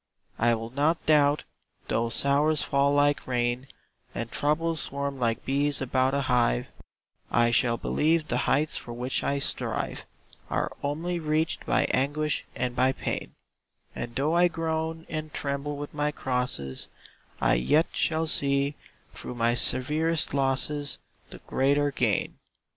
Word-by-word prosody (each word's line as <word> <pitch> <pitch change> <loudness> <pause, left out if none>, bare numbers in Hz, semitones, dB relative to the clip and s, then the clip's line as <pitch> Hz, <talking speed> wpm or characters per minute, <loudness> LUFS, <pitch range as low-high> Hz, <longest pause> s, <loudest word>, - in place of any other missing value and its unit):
I 115 +1 +4
will 115 +1 -6
not 150 +5 +1
doubt, 150 -1 +4 0.4
though 115 0 0
sorrows 145 +5 +2
fall 140 0 +2
like 145 0 +2
rain, 120 +1 -1 0.5
And 115 0 -4
troubles 160 +2 0
swarm 140 -1 -4
like 115 -2 -1
bees 140 +1 +2
about 130 +1 +1
a 140 - +1
hive; 120 - +1 0.6
I 120 0 +3
shall 120 -1 +3
believe 155 +4 +1
the 125 -3 0
heights 150 +3 +2
for 120 - -5
which 125 +2 -2
I 140 - 0
strive 140 - -1 0.4
Are - - -1
only 165 +5 -2
reached 155 0 -1
by - - +3
anguish 145 +3 0
and 125 -1 -2
by 130 +1 +3
pain; - - -4 0.6
And 120 0 -5
though 150 +5 +1
I 175 +1 +5
groan 160 -1 -3
and 155 -1 -5
tremble 140 +1 -3
with 145 0 -7
my 150 0 0
crosses, 125 - -1 0.5
I - - +3
yet 105 - +3
shall 160 0 +1
see, 140 -2 +2 0.4
through 125 - -7
my 115 0 +2
severest 155 +7 +2
losses, 140 +1 0 0.3
The - - -10
greater 140 +2 +2
gain. 115 -7 0
140 Hz, 140 wpm, -27 LUFS, 125-150 Hz, 0.6 s, I